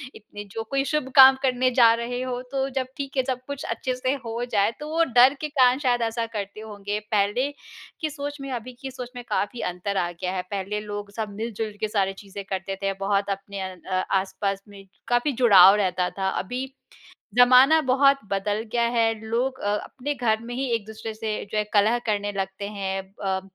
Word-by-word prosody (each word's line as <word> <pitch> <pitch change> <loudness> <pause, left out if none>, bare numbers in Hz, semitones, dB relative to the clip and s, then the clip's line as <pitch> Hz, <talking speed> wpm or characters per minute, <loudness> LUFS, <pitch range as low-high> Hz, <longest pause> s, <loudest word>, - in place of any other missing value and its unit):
"इतने 205 0 -10
जो 225 - -2
कोई 275 0 +2
शुभ 285 -4 -1
काम 265 -1 +10
करने 255 -1 +2
जा 230 -1 +8
रहे 245 +1 -3
हो, 250 -1 -3
तो 270 -1 0
जब 255 - -3
ठीक 275 0 -5
है।" 260 - +3
सब 255 -1 -2
कुछ 280 -1 -5
अच्छे 255 -1 -3
से 255 +1 0
हो 230 +1 -3
जाए, 215 -3 +1
तो 300 +1 -6
वो 330 - +4 0.2
डर 260 +3 +8
के 300 - -3
कारण 250 0 +6
शायद 245 -1 +2
ऐसा 230 0 -2
करते 200 0 -5
होंगे। 205 -1 -4
पहले 210 +7 +1 0.5
की 310 - -1
सोच 290 0 -6
में, 275 -1 -6
अभी 250 0 -5
की 270 - -5
सोच 250 -1 -7
में 245 - -7
काफ़ी 235 +4 -1
अंतर 195 +2 -3
आ 175 0 0
गया 180 +2 -4
है। 185 - -1
पहले 200 +1 -2
लोग 205 0 -5
सब 220 0 -4
मिल-जुल 220 -1 -4
के 215 - 0
सारी 195 -2 0
चीज़ें 200 0 -8
करते 195 0 -4
थे। 195 - +1
बहुत 200 0 +1
अपने 195 0 -4
अ 185 0 -4
अ, 185 +1 -2 0.2
आस-पास 195 +1 -2
में 200 -1 -13 0.2
काफ़ी 245 +4 +2
जुड़ाव 200 -5 +8
रहता 185 -3 0
था। 190 0 0
अभी 245 +7 -5 0.8
ज़माना 255 +5 +7
बहुत 275 +1 +5
बदल 205 +2 -1
गया 235 - +2
है, 225 -1 +3
लोग 250 +4 -1
अ 205 0 0
अपने 280 +2 -4
घर 225 -5 +1
में 240 +1 -6
ही 265 +2 -2
एक-दूसरे 220 0 -5
से, 220 0 -3 0.2
जो 215 - 0
है, 210 - +1
कलह 215 +4 +4
करने 205 -1 -1
लगते 195 0 -4
हैं 195 -1 -2 0.2
अ, 190 0 0
220 Hz, 205 wpm, -25 LUFS, 200-255 Hz, 0.8 s, काम